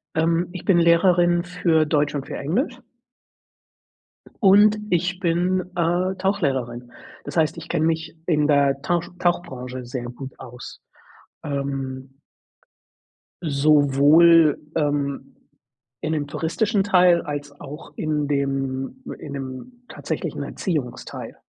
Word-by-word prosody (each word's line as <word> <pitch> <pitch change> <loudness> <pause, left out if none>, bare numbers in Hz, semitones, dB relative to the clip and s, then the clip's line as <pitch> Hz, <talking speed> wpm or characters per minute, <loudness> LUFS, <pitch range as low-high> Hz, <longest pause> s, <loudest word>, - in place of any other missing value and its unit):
Ähm, 165 +2 +1
ich 185 - -8
bin 190 - +3
Lehrerin 175 0 +4
für 170 -3 +1
Deutsch 150 -1 +1
und 140 -1 -4
für - - -5
Englisch 245 - -2 1.6
und 205 +2 +6
ich 180 +1 0
bin, 180 +1 +1 0.2
äh, 175 +3 +1
Tauchlehrerin. 135 -11 -2 0.3
Das - - -7
heißt, 160 0 +2
ich 165 0 -10
kenne 160 -2 +1
mich 160 0 -2
in 150 -4 +2
der 140 -2 +2
Tausch 170 +3 -1
Tauchbranche 130 -8 -2
sehr 120 0 -5
gut 130 +2 -9
aus. 125 -1 -11 0.6
Ähm 135 -1 -4 1.3
sowohl, 150 +2 +5 0.2
ähm, 140 -2 -2 0.7
in 155 - -2
'nem 150 -2 -1
touristischen 200 +8 0
Teil, 180 -3 +4
als 145 -1 -5
auch 150 +3 -10
in 150 -2 -1
dem 135 - -2 0.2
in 145 - -8
'nem 140 - -8
tatsächlichen - - -4
Erziehungsteil. 150 - -4
155 Hz, 115 wpm, -23 LUFS, 140-175 Hz, 1.6 s, und